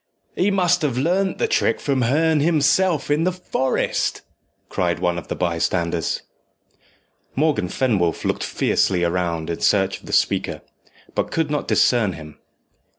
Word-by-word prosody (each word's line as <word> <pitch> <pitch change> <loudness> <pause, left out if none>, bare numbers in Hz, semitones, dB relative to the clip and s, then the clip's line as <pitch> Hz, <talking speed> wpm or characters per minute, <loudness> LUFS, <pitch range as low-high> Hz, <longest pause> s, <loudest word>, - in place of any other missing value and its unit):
"He 190 - +2
must 180 -3 +2
have 140 -5 -1
learnt 180 +8 +1
the 470 - +1
trick 460 - +1
from 135 -2 0
Herne 155 +6 +2
himself 155 +1 +2
in 150 +2 +2
the 185 - +2
forest," 175 -7 -1 0.4
cried 85 -1 -1
one 85 -1 0
of 85 - -12
the - - -3
bystanders. 85 -1 -1 1.1
Morgan 150 - +1
Fenwolf 100 -11 0
looked - - -1
fiercely 90 -2 +1
round 85 -2 -1
in 85 - -4
search 95 -2 +2
of - - -17
the - - -6
speaker, - - 0 0.5
but - - -1
could 160 -2 -1
not 150 - -2
discern 115 -6 +3
him. 75 -2 -11
130 Hz, 150 wpm, -21 LUFS, -, 1.1 s, discern